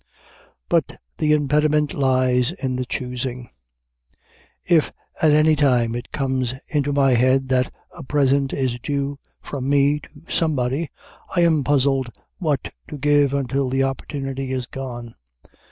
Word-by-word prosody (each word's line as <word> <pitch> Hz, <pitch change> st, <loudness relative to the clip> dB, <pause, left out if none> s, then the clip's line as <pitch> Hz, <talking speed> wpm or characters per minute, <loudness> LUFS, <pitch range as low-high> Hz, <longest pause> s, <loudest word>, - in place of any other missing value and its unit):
But -, -, 0 dB, 0.2 s
the 150 Hz, -, +2 dB
impediment 150 Hz, 0 st, +2 dB
lies 130 Hz, -2 st, +2 dB
in 130 Hz, -8 st, -3 dB
the 125 Hz, 0 st, -3 dB
choosing. 125 Hz, 0 st, -4 dB, 1.1 s
If, 165 Hz, -4 st, +3 dB, 0.3 s
at 160 Hz, -, +5 dB
any 155 Hz, +1 st, +5 dB
time, 125 Hz, -6 st, +2 dB
it 120 Hz, +1 st, -6 dB
comes 130 Hz, -3 st, -1 dB
into 145 Hz, -1 st, 0 dB
my 140 Hz, -1 st, +3 dB
head 130 Hz, +2 st, +3 dB
that 130 Hz, -1 st, +1 dB, 0.2 s
a 175 Hz, -, -9 dB
present 140 Hz, 0 st, +1 dB
is 130 Hz, -3 st, -1 dB
due 140 Hz, +2 st, -2 dB, 0.2 s
from 135 Hz, -2 st, -4 dB
me 145 Hz, +1 st, +3 dB
to -, -, -15 dB, 0.2 s
somebody, 145 Hz, -1 st, 0 dB, 0.5 s
I 175 Hz, -, +4 dB
am 160 Hz, -4 st, +3 dB
puzzled 135 Hz, -2 st, +2 dB, 0.3 s
what 155 Hz, -6 st, -1 dB
to 150 Hz, -, -7 dB
give 145 Hz, -1 st, +3 dB
until 140 Hz, -1 st, 0 dB
the 135 Hz, +1 st, +1 dB
opportunity 135 Hz, 0 st, -3 dB
is 130 Hz, -1 st, -2 dB
gone. 120 Hz, -3 st, -7 dB
135 Hz, 135 wpm, -22 LUFS, 130-145 Hz, 1.1 s, at